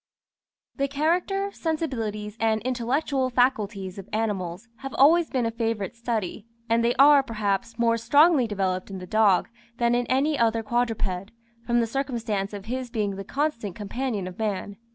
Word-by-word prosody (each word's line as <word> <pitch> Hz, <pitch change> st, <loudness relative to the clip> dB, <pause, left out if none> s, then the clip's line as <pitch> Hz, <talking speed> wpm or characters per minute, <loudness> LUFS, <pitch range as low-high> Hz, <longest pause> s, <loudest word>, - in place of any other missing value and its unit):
The 275 Hz, 0 st, +1 dB
character, 355 Hz, +8 st, 0 dB
sensibilities, 225 Hz, -, -3 dB
and 220 Hz, -1 st, +2 dB
intellectual 255 Hz, +2 st, 0 dB
faculties 210 Hz, -7 st, 0 dB
of 195 Hz, -, -10 dB
animals 205 Hz, -2 st, -2 dB
have 270 Hz, 0 st, -7 dB
always 325 Hz, +4 st, +5 dB
been 250 Hz, -3 st, 0 dB
a 230 Hz, -, 0 dB
favourite 225 Hz, -4 st, -2 dB
study, 225 Hz, -3 st, -3 dB, 0.2 s
and 230 Hz, 0 st, +2 dB
they 235 Hz, +1 st, +2 dB
are, 285 Hz, +1 st, +7 dB
perhaps, 215 Hz, -2 st, -2 dB
more 230 Hz, -1 st, +2 dB
strongly 285 Hz, +3 st, +4 dB
developed 190 Hz, -3 st, -2 dB
in 195 Hz, -, -6 dB
the 180 Hz, -, -7 dB
dog 210 Hz, -2 st, +3 dB, 0.3 s
than 235 Hz, 0 st, +2 dB
in 245 Hz, 0 st, +1 dB
any 280 Hz, +3 st, +1 dB
other 225 Hz, -1 st, +2 dB
quadruped, 215 Hz, -5 st, -1 dB, 0.4 s
from 240 Hz, 0 st, +3 dB
the -, -, +1 dB
circumstance 230 Hz, -5 st, -2 dB
of 205 Hz, -1 st, -8 dB
his 255 Hz, +2 st, -4 dB
being 210 Hz, -4 st, -1 dB
the 195 Hz, -, -6 dB
constant 235 Hz, -, -2 dB
companion 215 Hz, -1 st, -3 dB
of 180 Hz, +2 st, -9 dB
man. 205 Hz, -2 st, -2 dB
230 Hz, 160 wpm, -25 LUFS, 205-260 Hz, 0.4 s, are